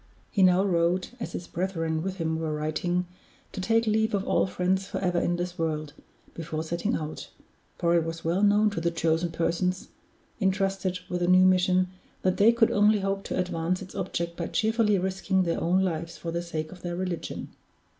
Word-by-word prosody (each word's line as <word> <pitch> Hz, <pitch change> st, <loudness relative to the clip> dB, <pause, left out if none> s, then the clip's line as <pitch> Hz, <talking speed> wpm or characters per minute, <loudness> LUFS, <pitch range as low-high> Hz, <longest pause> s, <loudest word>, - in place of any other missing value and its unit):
He 200 Hz, -, +1 dB
now 185 Hz, 0 st, +5 dB
wrote, 180 Hz, 0 st, +1 dB
as -, -, -5 dB
his 175 Hz, -, -5 dB
brethren 165 Hz, -3 st, -2 dB
with 190 Hz, +2 st, -3 dB
him 160 Hz, -3 st, -1 dB
were 155 Hz, -2 st, -2 dB
writing, 155 Hz, +4 st, -1 dB, 0.5 s
to 190 Hz, -, -5 dB
take 225 Hz, +4 st, +2 dB
leave 220 Hz, 0 st, +2 dB
of 200 Hz, 0 st, -2 dB
all -, -, +2 dB
friends 190 Hz, +1 st, 0 dB
forever 180 Hz, -3 st, 0 dB
in 175 Hz, -, 0 dB
this 175 Hz, 0 st, -4 dB
world, 155 Hz, -2 st, -2 dB, 0.4 s
before 160 Hz, -1 st, -4 dB
setting 170 Hz, +8 st, -1 dB
out 155 Hz, 0 st, -5 dB, 0.5 s
for 170 Hz, 0 st, +2 dB
it 170 Hz, -, +3 dB
was 165 Hz, 0 st, -6 dB
well 170 Hz, +4 st, +1 dB
known 210 Hz, +1 st, +4 dB
to 170 Hz, -, -3 dB
the 170 Hz, -, +2 dB
chosen 165 Hz, 0 st, 0 dB
persons 170 Hz, +3 st, -1 dB, 0.5 s
intrusted 195 Hz, -2 st, 0 dB
with 180 Hz, -, -2 dB
the 175 Hz, -, 0 dB
new 185 Hz, +1 st, +6 dB
mission 185 Hz, 0 st, +3 dB, 0.3 s
that 185 Hz, -1 st, +2 dB
they 215 Hz, +3 st, +6 dB
could 235 Hz, -1 st, +3 dB
only 210 Hz, 0 st, +4 dB
hope 195 Hz, 0 st, -1 dB
to -, -, -3 dB
advance 180 Hz, 0 st, -1 dB
its 190 Hz, -, -12 dB
object 170 Hz, -3 st, -3 dB
by 170 Hz, -, -3 dB
cheerfully 220 Hz, -3 st, +2 dB
risking 190 Hz, +1 st, 0 dB
their 170 Hz, -2 st, -1 dB
own 185 Hz, +3 st, +2 dB
lives 170 Hz, -2 st, -3 dB
for 170 Hz, -, -5 dB
the 170 Hz, +1 st, -2 dB
sake 155 Hz, -2 st, -4 dB
of 185 Hz, -, -12 dB
their 175 Hz, -1 st, -4 dB
religion. 180 Hz, -1 st, -4 dB
180 Hz, 195 wpm, -27 LUFS, 170-190 Hz, 0.5 s, new